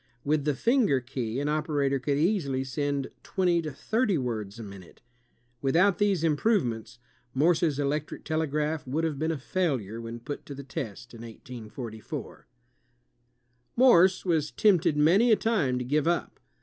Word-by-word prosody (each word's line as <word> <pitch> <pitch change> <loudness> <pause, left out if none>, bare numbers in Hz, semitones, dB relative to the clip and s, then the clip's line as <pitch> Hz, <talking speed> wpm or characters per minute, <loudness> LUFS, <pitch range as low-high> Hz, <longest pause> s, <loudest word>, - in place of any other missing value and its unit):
With 145 0 0
the 150 -2 +1
finger 230 - +2
key, 120 -1 -4
an 145 - -1
operator 150 -3 0
could 140 +2 -1
easily 150 -6 +1
send 140 0 -2
twenty 180 -3 +1
to 155 -2 -5
thirty 215 - 0
words 110 -5 -4
a 115 - -7
minute. 100 -4 -12 0.6
Without 175 +7 +3
these 200 -5 +2
improvements, 150 - 0 0.4
Morse's 160 0 +2
electric 145 +1 -2
telegraph 155 -1 -1
would 150 +6 -1
have 155 -4 -1
been 160 +1 0
a 160 - -2
failure 130 - -2
when 115 +1 -7
put 145 +5 -6
to 140 - -7
the 140 - -8
test 120 -6 -7
in 115 - -11
1844. 115 -1 -8 1.3
Morse 190 -8 +5
was 160 -4 +1
tempted 175 -7 +3
many 190 +11 +5
a - - +7
time 195 - 0
to 125 - -3
give 150 +4 +1
up. 170 0 -1
150 Hz, 150 wpm, -27 LUFS, 130-170 Hz, 1.3 s, a